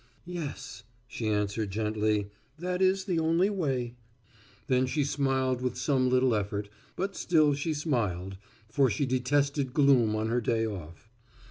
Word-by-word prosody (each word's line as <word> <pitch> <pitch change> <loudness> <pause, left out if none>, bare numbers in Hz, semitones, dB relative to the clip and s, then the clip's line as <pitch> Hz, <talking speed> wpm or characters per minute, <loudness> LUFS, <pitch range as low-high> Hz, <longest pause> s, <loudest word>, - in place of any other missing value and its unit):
"Yes," 165 -11 -6 0.3
she 120 -3 -4
answered 105 0 0
gently, 105 0 0 0.3
"that 180 +2 -2
is 190 0 +3
the 180 -4 0
only 165 +5 +2
way." 145 -10 0
And 120 0 -8 0.7
then 130 0 +3
she 145 +3 0
smiled 135 -2 0
with 125 -1 -2
some 130 -1 +1
little 130 -1 +3
effort, 100 -1 -2 0.3
but 195 +1 -3
still 155 -4 +3
she 150 +3 -2
smiled, 105 - -2 0.3
for 130 +4 +2
she 115 +6 0
detested 135 +1 0
gloom 130 -7 +4
on 110 +1 -1
her 120 +1 +1
day 115 0 +1
off. 90 -2 -7
130 Hz, 150 wpm, -29 LUFS, 110-145 Hz, 0.7 s, gloom